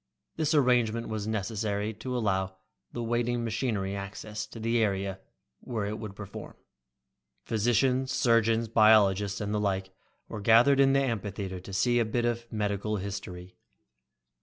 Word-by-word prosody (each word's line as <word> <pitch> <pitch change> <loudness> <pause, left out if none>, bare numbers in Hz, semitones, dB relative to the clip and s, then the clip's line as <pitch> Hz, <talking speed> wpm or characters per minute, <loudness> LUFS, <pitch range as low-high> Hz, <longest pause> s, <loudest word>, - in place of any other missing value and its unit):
This 155 0 +1
arrangement 120 -5 +2
was 110 -1 -3
necessary 105 0 -2
to 125 +4 -4
allow 95 -4 -1 0.4
the 120 - -4
waiting 120 +1 0
machinery 110 -4 -2
access 105 +2 -6
to 115 - -10
the 115 +1 +1
area 95 -2 -1 0.4
where 110 -4 -3
it 105 +1 -4
would 105 -3 -7
perform. 100 -2 -9 0.9
Physicians, 125 +4 +1
surgeons, 115 -2 +2
biologists 105 -3 +4
and 105 0 -3
the 105 - +1
like 95 -2 -1 0.4
were 105 - -6
gathered 120 +6 +5
in 135 0 +5
the 140 - +4
amphitheater 100 -6 -3
to 95 - -11
see 120 +6 +2
a - - +3
bit 120 +2 -1
of 120 0 -2
medical 105 0 -1
history. 90 -2 -6
110 Hz, 145 wpm, -28 LUFS, 100-120 Hz, 0.9 s, gathered